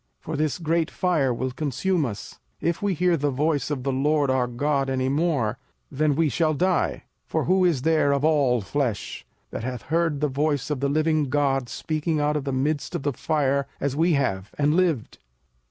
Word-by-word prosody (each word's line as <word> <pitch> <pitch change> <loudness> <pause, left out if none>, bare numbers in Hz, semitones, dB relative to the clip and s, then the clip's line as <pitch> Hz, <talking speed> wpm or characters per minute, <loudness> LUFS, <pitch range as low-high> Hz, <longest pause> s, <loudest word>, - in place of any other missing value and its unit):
for 160 - -5
this 150 -1 0
great 165 -1 0
fire 160 -8 +1
will 130 +2 -2
consume 155 +4 -1
us: 105 -4 -8 0.2
if 170 0 -1
we 200 -2 0
hear 180 +1 +2
the 145 -2 0
voice 145 +2 0
of 140 -4 -3
the 135 - 0
LORD 145 +1 +2
our 130 -1 +1
God 135 +2 0
any 130 0 0
more, 140 -6 0 0.3
then 145 +1 +1
we 160 +1 +2
shall 155 +3 +1
die. 185 +4 0 0.2
05:005:026 - - -48
For 160 - 0
who 185 +3 +3
is 160 -8 +2
there 155 -2 +3
of 140 +1 +1
all 140 -6 +3
flesh, 120 0 -3 0.2
that - - -5
hath 125 -1 -4
heard 165 -2 0
the 150 - +1
voice 145 +1 -1
of 145 - -1
the 140 +1 0
living 155 +1 +2
God 135 -3 +1
speaking 155 +4 -2
out 150 +1 +1
of 145 -2 -2
the 135 - -1
midst 140 +3 -1
of - - -3
the 145 -1 0
fire, 140 -1 0
as 140 -1 -1
we 165 +3 +3
have, 105 -9 0
and 150 +1 +2
lived? 165 -9 0
145 Hz, 200 wpm, -24 LUFS, 135-160 Hz, 0.3 s, who